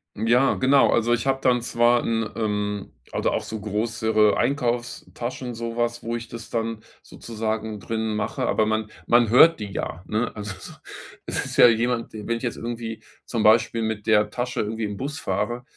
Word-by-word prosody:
Ja, 120 +5 +3
genau. 135 +2 +4
Also, 120 +1 +2
ich 120 +2 -1
habe 135 0 +2
dann 125 -1 +3
zwar 120 0 +2
'n, 115 -1 0
ähm 105 -2 -2 0.2
oder - - 0
auch - - -1
so 110 -1 -6
größere 110 0 +1
Einkaufstaschen, 125 0 -2
sowas, 120 +1 -2
wo 115 +1 -2
ich 115 0 -8
das 115 -1 -9
dann 115 -1 -2 0.2
sozusagen 110 -1 -4
drin 110 +1 -2
mache. 105 - -2
Aber 110 - +2
man 110 0 -1 0.2
man 120 -2 +4
hört 160 +8 +7
die 105 -1 -5
ja, 90 -2 -5
ne? 110 +3 -1
Also 105 -1 -5
so, - - -10 0.5
es - - -2
ist - - -6
ja - - +9
jemand 115 +1 0
d 105 -1 -7
wenn 115 - +1
ich 115 - -10
jetzt 120 - -2
irgendwie 115 -1 -5 0.2
zum 115 -3 -2
Beispiel 115 +1 +4
mit 110 -2 -3
der 105 -1 +4
Tasche 125 +3 -3
irgendwie 110 +1 -3
im 105 -1 -5
Bus 145 +6 -4
fahre, 120 +1 -2
115 Hz, 185 wpm, -24 LUFS, 110-120 Hz, 0.5 s, ja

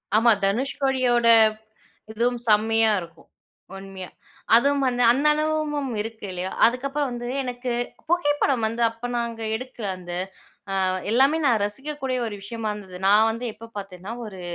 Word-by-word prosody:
ஆமா. 230 +1 +5
தனுஷ்கோடியோட, 255 +1 +1 0.8
இதுவும் 240 +2 0
செம்மையா 220 +1 +4
இருக்கும் 170 -1 -13 0.5
உண்மையா. 195 -1 -9 0.5
அதுவும் 280 +3 +3
வந்து 245 0 0
அந்த 275 +4 0
அனுபவமும் 305 -2 -1
இருக்கு 225 -1 -7
இல்லையா. 180 +1 -4
அதுக்கப்புறம் 275 +4 0
வந்து 240 0 -5 0.2
எனக்கு, 245 0 -4 0.4
புகைப்படம் 290 -7 +1
வந்து 230 +2 -4
அப்போ 230 +2 -7
நாங்க 235 -1 -3
எடுக்கிற 245 -2 -7
அந்த, 175 -1 -9 0.7
ஆ - - +2 0.3
எல்லாமே 270 +7 +4
நான் 230 -5 +3
ரசிக்கக்கூடிய 265 +3 -3
ஒரு 210 - -5
விஷயமா 220 +1 -4
இருந்தது, 190 -3 -10
நான் 215 +3 +6
வந்து 230 +2 -5
எப்போ 230 +1 -11
பார்த்தேன்னா, 195 +1 -8
ஒரு 190 -3 -9
235 Hz, 135 wpm, -24 LUFS, 215-265 Hz, 0.8 s, நான்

